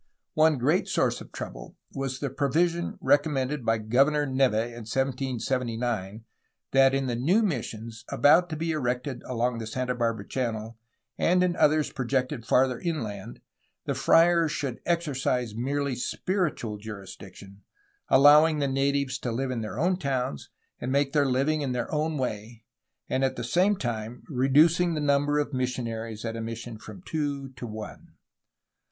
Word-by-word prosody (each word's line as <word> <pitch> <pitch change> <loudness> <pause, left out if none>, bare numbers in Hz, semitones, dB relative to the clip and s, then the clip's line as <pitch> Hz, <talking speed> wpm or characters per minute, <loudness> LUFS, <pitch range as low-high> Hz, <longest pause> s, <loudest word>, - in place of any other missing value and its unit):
One 155 -1 +4
great 150 +9 +1
source - - 0
of - - -12
trouble - - -8 0.2
was 135 -1 -4
the 140 -3 -2
provision 165 +5 0
recommended 145 -1 +1
by 115 0 +2
Governor 135 +7 +2
Neve 130 -4 +2
in 120 +2 -2
1779 120 -5 -2 0.5
that 135 0 +5
in 135 0 0
the 120 -2 -1
new 175 - +2
missions 115 - -4
about 170 +5 +4
to 160 - -3
be 165 +1 -2
erected 125 -3 -2
along 120 -1 -1
the 110 - -5
Santa 125 +2 -2
Barbara 115 -4 -2
Channel 115 -3 -3 0.4
and 180 +1 +3
in 180 -1 +1
others 155 -1 +3
projected 130 -1 -1
for 115 - -20
farther 130 -1 +3
inland 115 - -4 0.4
the - - -1
friars 170 -1 +4
should 135 -6 -4
exercise 135 -8 0
merely 140 +4 -1
spiritual 140 - -2
jurisdiction, 100 -1 -10 0.5
allowing 150 +3 +7
the 140 -1 0
natives 140 0 0
to 120 - -3
live 130 +3 -2
in 120 -3 -2
their 110 +1 -5
own 180 +6 +1
towns 130 - -3 0.3
and 125 - -3
make 140 0 +1
their 145 -2 +3
living 140 +4 +1
in 135 -3 -1
their 125 +5 -3
own 155 0 0
way, 115 -2 -4 0.4
and 130 - 0
at 135 - +1
the 120 - -5
same 180 - +2
time 120 - -4
reducing 155 +6 +3
the - - -1
number 145 0 +2
of 145 -1 -1
missionaries 115 -3 -3
at 115 0 -3
a 115 - -4
mission 115 0 -6
from 180 - -11
two 145 -4 -3
to 125 -2 -8
one. 110 -1 -9
130 Hz, 160 wpm, -27 LUFS, 115-150 Hz, 0.5 s, allowing